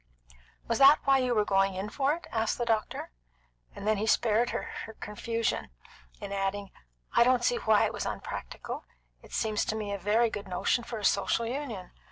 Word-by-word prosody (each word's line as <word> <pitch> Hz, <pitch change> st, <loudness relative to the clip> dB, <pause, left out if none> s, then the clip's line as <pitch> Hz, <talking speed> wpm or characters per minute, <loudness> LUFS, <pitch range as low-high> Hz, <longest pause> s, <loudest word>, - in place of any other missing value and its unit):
"Was 230 Hz, -, 0 dB
that 275 Hz, +2 st, +9 dB
why 270 Hz, -1 st, +4 dB
you 250 Hz, -2 st, +1 dB
were 210 Hz, -1 st, +3 dB
going 195 Hz, -1 st, +2 dB
in 190 Hz, +2 st, -3 dB
for 280 Hz, +5 st, +1 dB
it?" 345 Hz, -, -11 dB
asked 225 Hz, -1 st, 0 dB
the 240 Hz, -, -1 dB
doctor; 220 Hz, -, -1 dB, 0.6 s
and 200 Hz, -, -7 dB
then 215 Hz, -1 st, +3 dB
he 215 Hz, +2 st, -1 dB
spared 230 Hz, +1 st, +3 dB
her -, -, -4 dB, 0.3 s
confusion 230 Hz, +2 st, -2 dB, 0.5 s
in 200 Hz, -1 st, -7 dB
adding: 195 Hz, 0 st, -2 dB, 0.4 s
"I -, -, +7 dB
don't 250 Hz, 0 st, +3 dB
see 240 Hz, -, +2 dB
why 220 Hz, -2 st, +3 dB
it -, -, -2 dB
was -, -, -3 dB
unpractical. -, -, -6 dB, 0.4 s
It -, -, -16 dB
seems 215 Hz, -1 st, 0 dB
to 220 Hz, -, -2 dB
me 210 Hz, -2 st, -3 dB
a 200 Hz, -, -3 dB
very 220 Hz, +4 st, +2 dB
good 205 Hz, -1 st, -6 dB
notion 185 Hz, +6 st, 0 dB
for 230 Hz, -, -6 dB
a 210 Hz, -, -3 dB
Social 215 Hz, +3 st, +2 dB
Union. 230 Hz, -7 st, -5 dB
220 Hz, 195 wpm, -29 LUFS, 200-240 Hz, 0.6 s, that